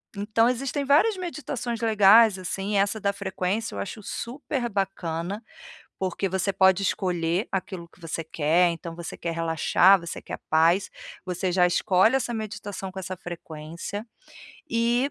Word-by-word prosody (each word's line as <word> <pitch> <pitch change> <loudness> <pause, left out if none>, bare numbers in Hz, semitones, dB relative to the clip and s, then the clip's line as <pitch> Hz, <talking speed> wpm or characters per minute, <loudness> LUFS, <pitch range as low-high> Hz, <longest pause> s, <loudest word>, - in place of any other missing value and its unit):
então, 215 +3 +2
existem 270 +3 -1
várias 370 +10 +4
meditações 260 -9 -4
legais 215 -1 +6
assim. 195 +3 -2
Essa 200 +2 +1
da 200 -1 +2
frequência 200 +3 -3
eu - - -4
acho 215 +2 -5
super 250 +3 -4
bacana, 195 -1 -3 0.6
porque 190 +1 -1
você 190 +2 0
pode 190 0 +4
escolher 180 0 0
aquilo 185 -2 -4
que 170 - -24
você 165 -1 -4
quer. 165 +3 +2
Então, 165 0 -7
você 170 -1 -7
quer 170 -1 -3
relaxar, 165 +3 +4
você 170 0 -6
quer - - -7
paz, 165 +5 +3 0.3
você 180 0 -2
já 180 0 +4
escolhe 190 +6 +3
essa 240 -2 -2
meditação 205 -3 -5
com 190 - -8
essa 185 0 -5
frequência. 170 +3 -7 0.7
E 240 +4 +1
195 Hz, 145 wpm, -25 LUFS, 175-225 Hz, 0.7 s, legais